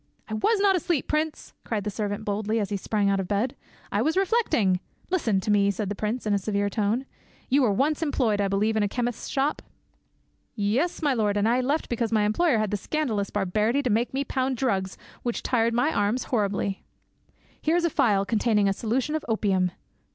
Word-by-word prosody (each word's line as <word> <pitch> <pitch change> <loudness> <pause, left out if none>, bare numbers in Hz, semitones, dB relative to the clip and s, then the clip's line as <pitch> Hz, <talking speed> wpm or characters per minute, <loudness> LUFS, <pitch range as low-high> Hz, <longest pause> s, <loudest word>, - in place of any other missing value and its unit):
"I 220 - -6
was 410 - +2
not 395 -1 +4
asleep, 340 -4 0
prince!" 305 0 -2
cried 215 -3 -2
the 210 - -3
servant 205 +1 -3
boldly, 215 +2 -1
as 205 -2 -2
he - - 0
sprang 205 +1 0
out 195 0 +2
of 190 - -3
bed; 210 +6 0 0.4
"I 205 - +1
was 315 +8 +1
reflecting— 375 - +2
" - - -36
"Listen 230 - +1
to 210 - -1
me," 200 -1 +4
said 200 0 -2
the 205 - -3
prince 220 +4 -3
in 210 - +1
a 200 - +2
severe 200 0 -1
tone; 220 +5 0 0.4
"you 275 +3 +4
were 240 -5 +3
once 280 +10 +1
employed, 245 -9 +1
I 200 - +1
believe, 205 +3 +1
in 215 - +2
a 205 - +2
chemist's 245 +2 -3
shop?" 280 +2 0 0.9
"Yes, 245 - 0
my 290 -2 +3
lord, 210 -4 +1
and 205 +1 +2
I 245 +2 +3
left 285 +5 0
because 230 -1 -1
my 215 -2 +3
employer 235 +6 +2
had 215 -2 0
the 205 - 0
scandalous 220 -4 -1
barbarity 210 +7 0
to 250 - 0
make 230 +4 +1
me 270 +1 -1
pound 260 -1 -1
drugs, 195 -7 -1 0.2
which 240 -1 -3
tired 230 -2 +1
my 270 +7 +2
arms 205 +5 +1
horribly." 200 -3 0 0.8
"Here 315 +2 +2
is 350 -1 +2
a 340 - +1
phial 200 -7 +2
containing 210 -2 +2
a 195 - +2
solution 240 +8 -1
of 315 -1 -1
opium." 195 -5 +1
220 Hz, 210 wpm, -26 LUFS, 205-265 Hz, 0.9 s, not